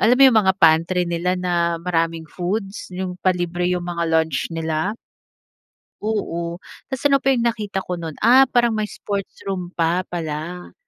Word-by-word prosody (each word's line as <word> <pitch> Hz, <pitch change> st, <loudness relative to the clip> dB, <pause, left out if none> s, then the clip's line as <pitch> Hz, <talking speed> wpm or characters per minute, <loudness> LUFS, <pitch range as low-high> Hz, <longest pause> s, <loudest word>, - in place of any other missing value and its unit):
alam 245 Hz, +3 st, +5 dB
mo 275 Hz, -, +5 dB
yung 220 Hz, -, +6 dB
mga 190 Hz, 0 st, +4 dB
pantry 165 Hz, +2 st, +4 dB
nila 175 Hz, +2 st, -1 dB
na 175 Hz, -2 st, 0 dB
maraming 165 Hz, -2 st, -1 dB
foods? 195 Hz, +3 st, -4 dB
Yung 180 Hz, 0 st, -4 dB
palibre 175 Hz, -1 st, 0 dB
yung 180 Hz, -1 st, -1 dB
mga 170 Hz, -1 st, -2 dB
lunch 160 Hz, -3 st, +1 dB
nila? 165 Hz, +5 st, -2 dB, 1.1 s
Oo, 170 Hz, -5 st, -2 dB, 0.3 s
tas 265 Hz, -, -2 dB
ano 275 Hz, -, +5 dB
pa 270 Hz, -, +4 dB
yung 240 Hz, -2 st, +1 dB
nakita 205 Hz, -4 st, -3 dB
ko 180 Hz, -1 st, -4 dB
nun, 165 Hz, -2 st, -5 dB
ah, 255 Hz, +4 st, +7 dB
parang 240 Hz, -2 st, +3 dB
may 215 Hz, -, 0 dB
sports 200 Hz, -1 st, -5 dB
room 180 Hz, -2 st, -4 dB
pa 170 Hz, +2 st, +1 dB
pala. 170 Hz, +1 st, -5 dB
180 Hz, 165 wpm, -21 LUFS, 170-200 Hz, 1.1 s, ah